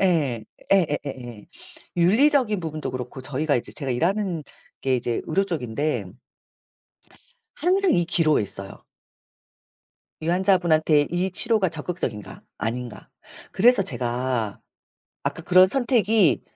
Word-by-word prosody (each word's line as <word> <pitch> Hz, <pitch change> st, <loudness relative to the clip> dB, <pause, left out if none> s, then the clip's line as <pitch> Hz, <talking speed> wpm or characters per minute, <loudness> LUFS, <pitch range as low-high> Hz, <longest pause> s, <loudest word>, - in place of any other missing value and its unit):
예. 150 Hz, -, +1 dB, 0.3 s
예예예예. 135 Hz, -, -1 dB, 0.5 s
윤리적인 220 Hz, -, +3 dB
부분도 155 Hz, -2 st, -4 dB
그렇고 125 Hz, +1 st, -6 dB
저희가 145 Hz, +3 st, -1 dB
이제 120 Hz, -, -4 dB
제가 135 Hz, -3 st, -4 dB
일하는 175 Hz, -, 0 dB, 0.4 s
게 130 Hz, -1 st, +1 dB
이제 120 Hz, -1 st, -2 dB
의료 195 Hz, +5 st, +1 dB
쪽인데 150 Hz, -, -2 dB, 1.5 s
항상 375 Hz, +4 st, +2 dB
이 175 Hz, -, +2 dB
기로에 165 Hz, -, +2 dB
있어요. 100 Hz, -1 st, -8 dB, 1.4 s
이 160 Hz, -, -4 dB
환자분한테 170 Hz, -5 st, +3 dB
이 180 Hz, +3 st, -1 dB
치료가 215 Hz, 0 st, +2 dB
적극적인가? 155 Hz, -, -5 dB, 0.2 s
아닌가? 120 Hz, -1 st, -5 dB, 0.4 s
그래서 240 Hz, +1 st, +4 dB
제가 120 Hz, -, -2 dB, 0.6 s
아까 -, -, -3 dB
그런 185 Hz, +1 st, +6 dB
선택이 225 Hz, -, +2 dB
160 Hz, 260 characters per minute, -24 LUFS, 130-190 Hz, 1.5 s, 그런